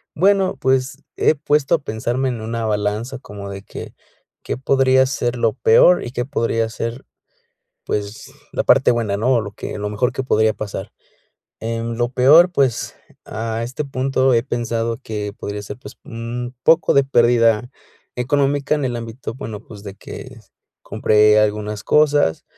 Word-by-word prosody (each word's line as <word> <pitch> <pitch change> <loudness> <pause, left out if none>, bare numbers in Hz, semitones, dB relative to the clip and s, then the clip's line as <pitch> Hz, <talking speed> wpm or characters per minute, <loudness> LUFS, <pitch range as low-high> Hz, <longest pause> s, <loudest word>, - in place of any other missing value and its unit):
Bueno, 195 +2 +2
pues, 130 +2 0
he - - +3
puesto 150 +1 +1
a 165 - +4
pensarme 120 +3 -2
en 120 -3 -4
una 115 0 -3
balanza 105 +4 -2
como 100 -5 -9
de 100 0 -8
que, - - -9 0.5
¿qué - - -3
podría 130 0 +3
ser 120 -3 -2
lo 115 -2 +1
peor 115 +11 +5
y 120 - -6
que 120 - -2
podría 115 -4 -1
ser, 115 +3 -5 0.8
pues, 105 +1 -4 0.2
la - - -1
parte - - +5
buena, 110 -4 -1
no? 125 +5 +2
O 115 - +2
lo 100 -1 -7
que - - -6
lo 105 0 -3
mejor 120 +4 0
que 135 - -3
podría 110 -4 +2
pasar. 100 0 -6 0.7
Em, 115 +1 -3
lo 120 0 0
peor, 150 +8 +6
pues, 135 -7 0 0.3
a 115 +1 -4
este 130 +5 -4
punto 135 -1 +1
he 115 - +4
pensado 115 -2 -2
que 105 -2 -4
podría 100 0 -5
ser 105 +3 -8
pues, 130 - -12
un 120 +2 -6
poco 165 -2 +4
de 140 - +6
pérdida 120 -2 +3 0.5
económica 140 +3 +1
en 145 - -2
el 125 -2 -1
ámbito 115 +1 -7
bueno 110 -6 -6
pues 105 -3 -13
de 100 -2 -7
que, 130 +3 -10 0.4
compré 105 0 +3
algunas 105 -1 -1
cosas, 145 - +2
120 Hz, 165 wpm, -20 LUFS, 110-130 Hz, 0.8 s, peor